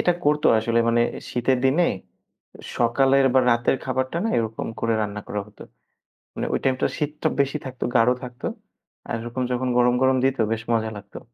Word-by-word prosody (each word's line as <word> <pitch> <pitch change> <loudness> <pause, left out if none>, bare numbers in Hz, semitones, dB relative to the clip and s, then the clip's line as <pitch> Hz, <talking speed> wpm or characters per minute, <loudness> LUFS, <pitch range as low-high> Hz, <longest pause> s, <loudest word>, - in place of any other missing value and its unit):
এটা 175 - +3
করতো 150 +1 +2
আসলে 115 +1 0
মানে 120 0 +3 0.3
শীতের 125 +1 +1
দিনে 155 +7 +3 0.9
সকালের 135 +3 +3
বা 130 - +6
রাতের 120 +2 +2
খাবারটা 130 +4 -1
না 225 - +1
এরকম 110 -1 -3
করে 115 0 +1
রান্না 105 0 -3
করা 105 - -2
হত। 105 - -21 0.8
মানে - - -3
ওই - - +1
টাইমটা 130 -1 +1
শীতটা 150 0 -2
বেশি 140 +2 -1
থাকতো, 130 -1 -5
গাঢ় 120 +1 +5
থাকত 125 +1 -9 0.7
আর - - -1
এরকম 120 +2 -4
যখন 125 +1 -1
গরম 125 0 +4
গরম 130 0 +4
দিত 135 0 +2
বেশ 115 -1 -1
মজা 110 -1 0
লাগতো। 100 0 -10
125 Hz, 175 wpm, -23 LUFS, 115-135 Hz, 0.9 s, বা